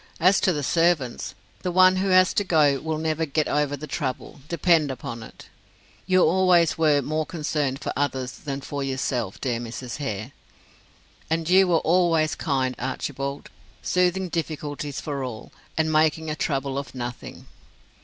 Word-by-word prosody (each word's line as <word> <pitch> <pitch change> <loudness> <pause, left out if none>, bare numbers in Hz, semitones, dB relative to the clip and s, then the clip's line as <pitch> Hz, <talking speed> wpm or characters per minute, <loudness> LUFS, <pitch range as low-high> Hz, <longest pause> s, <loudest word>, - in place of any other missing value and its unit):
"As 185 +4 +5
to 185 - +3
the 150 -4 -2
servants, 165 -5 +1 0.3
the 180 - -2
one 185 +1 +6
who 190 +1 0
has 185 -1 +5
to 205 - +1
go 150 -7 +3
will 160 +1 -3
never 160 0 -1
get 155 0 0
over 145 -1 0
the 150 - -7
trouble, 135 -2 -4
depend 165 -2 +3
upon 120 -3 -6
it. 110 - -12 0.6
You 185 -1 +4
always 175 -1 +4
were 150 -3 +3
more 155 +3 -1
concerned 150 -4 -2
for - - -4
others 130 -3 -1
than 140 -2 -6
for 140 0 -4
yourself, 130 -6 -2
dear 120 -3 -1
Mrs. 120 +1 -6
Hare." 110 -8 -4 1.0
"And 165 0 -1
you 190 +2 +5
were 170 -2 +3
always 165 -2 +2
kind, 130 -3 -1
Archibald, 135 +2 -4 0.3
smoothing 180 +1 +1
difficulties 150 -3 -4
for 140 -3 -4
all, 115 -4 -7 0.3
and 160 0 +1
making 155 0 +2
a - - -2
trouble 140 -3 -1
of 140 - -8
nothing. 120 -1 -7
150 Hz, 160 wpm, -24 LUFS, 135-170 Hz, 1.0 s, one